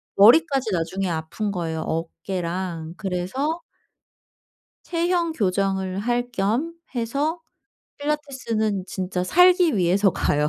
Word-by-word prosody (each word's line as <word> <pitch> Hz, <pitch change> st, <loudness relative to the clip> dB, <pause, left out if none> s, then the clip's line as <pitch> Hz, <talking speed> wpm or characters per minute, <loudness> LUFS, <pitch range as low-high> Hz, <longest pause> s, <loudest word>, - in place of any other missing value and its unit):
머리까지 265 Hz, +3 st, +5 dB
나중에 185 Hz, +3 st, -1 dB
아픈 165 Hz, +6 st, -3 dB
거예요, 165 Hz, -4 st, -3 dB
어깨랑. 170 Hz, 0 st, -4 dB
그래서 205 Hz, -, -2 dB, 1.2 s
체형 340 Hz, 0 st, 0 dB
교정을 190 Hz, -5 st, 0 dB
할 245 Hz, +3 st, 0 dB
겸 235 Hz, +10 st, 0 dB, 0.2 s
해서 280 Hz, +8 st, -1 dB, 0.6 s
필라테스는 260 Hz, -9 st, -1 dB
진짜 185 Hz, -1 st, -3 dB
살기 355 Hz, -, +5 dB
위해서 190 Hz, +2 st, +3 dB
가요. 150 Hz, -3 st, +1 dB
200 Hz, 235 characters per minute, -23 LUFS, 180-280 Hz, 1.2 s, 머리까지